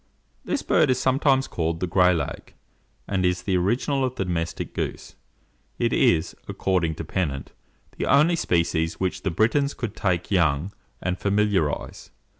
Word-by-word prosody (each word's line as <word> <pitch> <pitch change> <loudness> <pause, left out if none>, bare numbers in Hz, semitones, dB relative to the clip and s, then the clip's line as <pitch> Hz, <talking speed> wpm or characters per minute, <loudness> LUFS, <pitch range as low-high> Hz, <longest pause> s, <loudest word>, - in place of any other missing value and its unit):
This - - -2
bird - - +3
is 130 - +3
sometimes 135 0 +2
called 80 -1 -2
the 90 - 0
"Gray 90 0 +4
lag" 80 -5 -4 0.5
and 95 -2 0
is 90 0 +1
the 95 0 0
original 120 +9 +1
of 130 -1 -1
the 95 - -2
domestic 85 -2 -3
goose. - - -4 0.6
It - - 0
is, 85 +1 +2
according 85 -4 0
to 80 - -5
Pennant, 75 -6 -3 0.5
the - - -1
only 155 +5 +5
species 85 - 0
which 95 -1 -1
the 95 - -1
Britons 120 - +1
could 115 -4 -5
take 90 -2 -1
young, 85 0 +1 0.3
and 90 0 -1
familiarize. 100 -6 0
90 Hz, 155 wpm, -24 LUFS, 85-110 Hz, 0.6 s, only